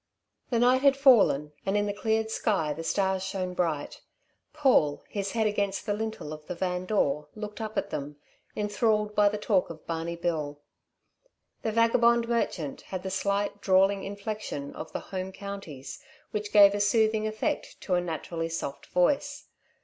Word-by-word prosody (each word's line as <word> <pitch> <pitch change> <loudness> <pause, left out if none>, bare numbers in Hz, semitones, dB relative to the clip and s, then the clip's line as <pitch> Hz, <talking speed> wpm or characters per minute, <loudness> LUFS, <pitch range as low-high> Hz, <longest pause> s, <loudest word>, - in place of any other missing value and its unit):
The 240 - +1
night 250 +2 +4
had 275 -1 +5
fallen, 200 - +5
and 195 +2 +1
in 205 - +1
the 205 - -1
cleared 220 +1 0
sky 190 -11 0
the 165 +3 -6
stars 190 +2 +1
shone 190 -2 -3
bright. 165 -5 -2 0.5
Paul, 260 - +3
his 200 -1 -3
head 225 -1 +1
against 200 -2 -1
the 210 - 0
lintel 215 -7 -4
of 150 0 -11
the 180 - -4
van 180 0 -2
door, 150 -8 +1
looked 210 0 -6
up 215 -1 -5
at - - -1
them, 145 0 -4 0.4
enthralled 210 0 +1
by 210 -1 +5
the 210 - -3
talk 205 -3 +1
of 160 -2 -10
Barney 165 +1 -3
Bill. 155 -4 -2 1.0
The 220 - -1
vagabond 230 +1 +4
merchant 185 - -1
had 185 -1 -6
the 190 - -4
slight 200 +1 -1
drawling 195 +1 +3
inflection 200 -7 -5
of 160 - -8
the - - -4
Home 185 0 -3
Counties, 190 -10 -8 0.3
which 210 0 -3
gave 200 -1 +8
a 205 - -1
soothing 215 +1 +2
effect 215 0 -3
to 185 - -2
a 180 - +3
naturally 165 0 -4
soft 160 -4 -5
voice. 180 +10 0
200 Hz, 170 wpm, -28 LUFS, 170-215 Hz, 1.0 s, gave